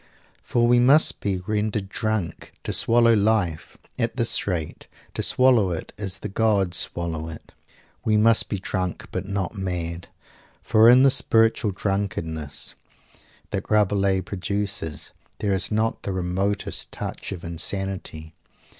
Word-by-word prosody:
For 120 Hz, 0 st, +1 dB
we 120 Hz, 0 st, +5 dB
must 140 Hz, +6 st, +5 dB
be 100 Hz, -3 st, -1 dB
"rendered 105 Hz, -1 st, -1 dB
drunk" 110 Hz, -5 st, -3 dB
to -, -, -1 dB
swallow 115 Hz, 0 st, +5 dB
Life 105 Hz, -6 st, 0 dB, 0.2 s
at 115 Hz, 0 st, -1 dB
this 115 Hz, -4 st, 0 dB
rate 85 Hz, -5 st, -4 dB, 0.3 s
to -, -, -2 dB
swallow 125 Hz, -7 st, +4 dB
it 85 Hz, -, -5 dB
as 100 Hz, -3 st, -2 dB
the -, -, -6 dB
gods 100 Hz, -3 st, +1 dB
swallow 80 Hz, -2 st, -2 dB
it. 80 Hz, -, -11 dB, 0.5 s
We 110 Hz, -1 st, +2 dB
must 115 Hz, +1 st, +4 dB
be 100 Hz, -, -2 dB
drunk 90 Hz, -1 st, -3 dB
but 95 Hz, +1 st, -4 dB
not 100 Hz, -2 st, -3 dB
mad. 90 Hz, -4 st, -4 dB, 0.6 s
For 110 Hz, +1 st, +5 dB
in 125 Hz, +2 st, +7 dB
the 135 Hz, -, +6 dB
spiritual 115 Hz, -3 st, +3 dB
drunkenness 90 Hz, -7 st, -3 dB, 0.8 s
that -, -, -4 dB
Rabelais 100 Hz, -2 st, +2 dB
produces 100 Hz, -4 st, -4 dB, 0.3 s
there 100 Hz, -2 st, -1 dB
is 95 Hz, -, +1 dB
not 110 Hz, +1 st, 0 dB
the 100 Hz, -, -4 dB
remotest 95 Hz, +3 st, -2 dB
touch -, -, -6 dB
of 95 Hz, -3 st, -7 dB
insanity. 85 Hz, -2 st, -3 dB
100 Hz, 135 wpm, -24 LUFS, 90-110 Hz, 0.8 s, in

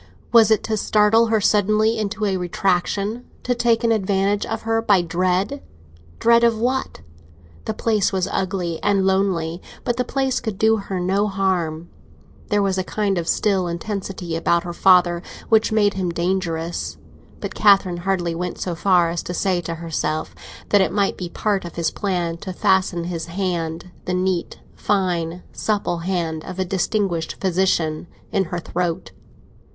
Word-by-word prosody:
Was 225 Hz, -1 st, +6 dB
it 220 Hz, -, +3 dB
to 220 Hz, -1 st, -1 dB
startle 215 Hz, +2 st, +4 dB
her 220 Hz, -1 st, +2 dB
suddenly 215 Hz, +2 st, +2 dB
into 210 Hz, 0 st, -2 dB
a 195 Hz, -2 st, +1 dB
retractation—to 195 Hz, +7 st, -1 dB
take 240 Hz, -1 st, +1 dB
an 230 Hz, -, +3 dB
advantage 200 Hz, -1 st, +1 dB
of 225 Hz, 0 st, -4 dB
her 225 Hz, 0 st, +1 dB
by 200 Hz, -5 st, +3 dB
dread? 185 Hz, +9 st, 0 dB, 0.6 s
Dread 235 Hz, 0 st, +4 dB
of 230 Hz, -1 st, +4 dB
what? 255 Hz, +4 st, -1 dB, 0.6 s
The 220 Hz, -, -3 dB
place 215 Hz, -3 st, +1 dB
was 190 Hz, -1 st, 0 dB
ugly 180 Hz, -3 st, -2 dB
and 195 Hz, -2 st, +2 dB
lonely, 190 Hz, -3 st, 0 dB, 0.2 s
but 240 Hz, -, -1 dB
the 250 Hz, -, +1 dB
place 265 Hz, +1 st, 0 dB
could 220 Hz, -5 st, -4 dB
do 220 Hz, +1 st, +3 dB
her 195 Hz, -2 st, -4 dB
no 195 Hz, +4 st, +1 dB
harm. 180 Hz, -5 st, -1 dB, 0.6 s
There 205 Hz, -1 st, +2 dB
was 190 Hz, -1 st, 0 dB
a -, -, 0 dB
kind 200 Hz, -1 st, -1 dB
of 165 Hz, -, -4 dB
still 190 Hz, -3 st, +1 dB
intensity 180 Hz, -1 st, -4 dB
about 170 Hz, +1 st, +1 dB
her 175 Hz, -1 st, -5 dB
father, 175 Hz, -1 st, +4 dB, 0.3 s
which 220 Hz, 0 st, +4 dB
made 205 Hz, -2 st, +3 dB
him 185 Hz, -2 st, -2 dB
dangerous, 170 Hz, -1 st, -2 dB, 0.4 s
but -, -, -5 dB
Catherine 195 Hz, -4 st, +4 dB
hardly 175 Hz, -1 st, -1 dB
went 180 Hz, +1 st, -4 dB
so 180 Hz, -, -3 dB
far 175 Hz, -1 st, +3 dB
as 170 Hz, -, -2 dB
to 180 Hz, -, -5 dB
say 185 Hz, -1 st, +1 dB
to 165 Hz, 0 st, -4 dB
herself 160 Hz, -1 st, -3 dB, 0.4 s
that 205 Hz, -, +5 dB
it 190 Hz, -, +1 dB
might 200 Hz, 0 st, +1 dB
be 180 Hz, -2 st, -5 dB
part 205 Hz, +1 st, -1 dB
of 175 Hz, -, -8 dB
his 170 Hz, -1 st, 0 dB
plan 175 Hz, -4 st, -2 dB
to 185 Hz, +2 st, -6 dB
fasten 190 Hz, -3 st, +1 dB
his 170 Hz, -1 st, -4 dB
hand—the 175 Hz, -1 st, -3 dB
neat, 185 Hz, -1 st, -1 dB
fine, 180 Hz, -3 st, -1 dB
supple 205 Hz, -5 st, -1 dB
hand 165 Hz, -3 st, -2 dB
of 185 Hz, -, -7 dB
a 185 Hz, -, 0 dB
distinguished 185 Hz, -2 st, -1 dB
physician—in 180 Hz, -1 st, -1 dB
her 175 Hz, +1 st, -4 dB
throat. 175 Hz, +1 st, -3 dB
190 Hz, 160 wpm, -21 LUFS, 175-210 Hz, 0.6 s, Was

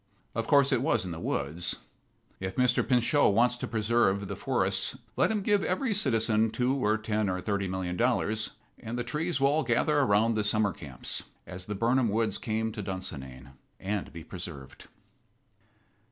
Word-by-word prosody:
Of 115 Hz, 0 st, -2 dB
course 140 Hz, -2 st, +5 dB
it 130 Hz, -3 st, +2 dB
was 120 Hz, -8 st, +1 dB
in 90 Hz, -, -5 dB
the 80 Hz, -, -5 dB
woods 85 Hz, +5 st, -1 dB, 0.6 s
if 95 Hz, 0 st, -4 dB
Mr. 125 Hz, -1 st, +3 dB
Pinchot 125 Hz, -3 st, +3 dB
wants 120 Hz, +2 st, +4 dB
to -, -, -4 dB
preserve 105 Hz, -3 st, +1 dB
the -, -, -4 dB
forests -, -, 0 dB, 0.2 s
let -, -, +3 dB
him 215 Hz, -2 st, -1 dB
give 205 Hz, 0 st, +2 dB
every 220 Hz, +6 st, 0 dB
citizen 115 Hz, -, +2 dB
two 125 Hz, +3 st, 0 dB
or 110 Hz, -5 st, +1 dB
ten 110 Hz, -1 st, -1 dB
or 90 Hz, 0 st, -1 dB
thirty 100 Hz, 0 st, -1 dB
million 90 Hz, -1 st, -3 dB
dollars, 110 Hz, -2 st, +1 dB, 0.3 s
and 115 Hz, +2 st, -5 dB
the 120 Hz, -, -1 dB
trees 150 Hz, +6 st, -2 dB
will 135 Hz, 0 st, +4 dB
all 155 Hz, +2 st, +2 dB
gather 140 Hz, +5 st, +2 dB
around 115 Hz, -3 st, +3 dB
the 110 Hz, -1 st, 0 dB
summer 105 Hz, -1 st, +1 dB
camps, 70 Hz, -5 st, -4 dB, 0.2 s
as 90 Hz, 0 st, -8 dB
the 105 Hz, -, -3 dB
Birnam 120 Hz, +3 st, +2 dB
woods 110 Hz, -1 st, +1 dB
came 110 Hz, -1 st, -1 dB
to 105 Hz, -1 st, -5 dB
Dunsinane, 70 Hz, -9 st, -6 dB, 0.3 s
and 100 Hz, 0 st, -3 dB
be 85 Hz, -1 st, -9 dB
preserved. 85 Hz, -6 st, -9 dB
110 Hz, 175 wpm, -29 LUFS, 95-125 Hz, 0.6 s, course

